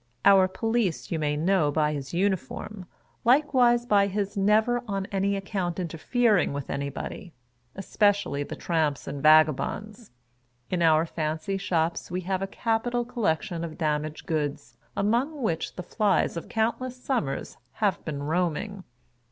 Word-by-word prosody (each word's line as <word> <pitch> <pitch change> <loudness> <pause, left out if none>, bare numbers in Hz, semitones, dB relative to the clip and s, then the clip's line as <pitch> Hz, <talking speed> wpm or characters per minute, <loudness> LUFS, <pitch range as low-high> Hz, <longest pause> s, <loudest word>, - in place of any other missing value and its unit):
Our 195 -2 +7
Police 220 -1 -1
you 165 - -1
may 150 -1 0
know 165 -2 +2
by 150 0 +1
his 140 -2 -5
uniform, 190 +1 -2 0.4
likewise 245 -2 +4
by 200 -3 +4
his 200 +1 -2
never 215 +4 +3
on 195 -2 -2
any 200 0 +1
account 195 -3 -3
interfering 185 - +1
with 140 -1 -5
anybody 140 +6 -5 0.2
— 120 0 -43
especially 200 -5 +1
the 145 - -5
tramps 155 -5 -1
and 140 0 -5
vagabonds. 155 - +3 0.6
In 180 -2 0
our 160 -1 +4
fancy 160 +4 -2
shops 170 -3 -1
Ave 180 +1 -2
have 185 +1 -2
a 195 - -1
capital 235 +3 -1
collection 170 -8 -1
of 160 -2 -6
damaged 155 -1 -2
goods, 150 -3 -3 0.2
among 250 +8 0
which 165 -7 -2
the 180 - -5
flies 200 +1 +1
of 165 - -6
countless 235 +3 -1
summers 245 - -2 0.2
"have 205 -4 0
been 145 -2 -4
roaming." 180 +5 -1
185 Hz, 145 wpm, -26 LUFS, 155-215 Hz, 0.6 s, Our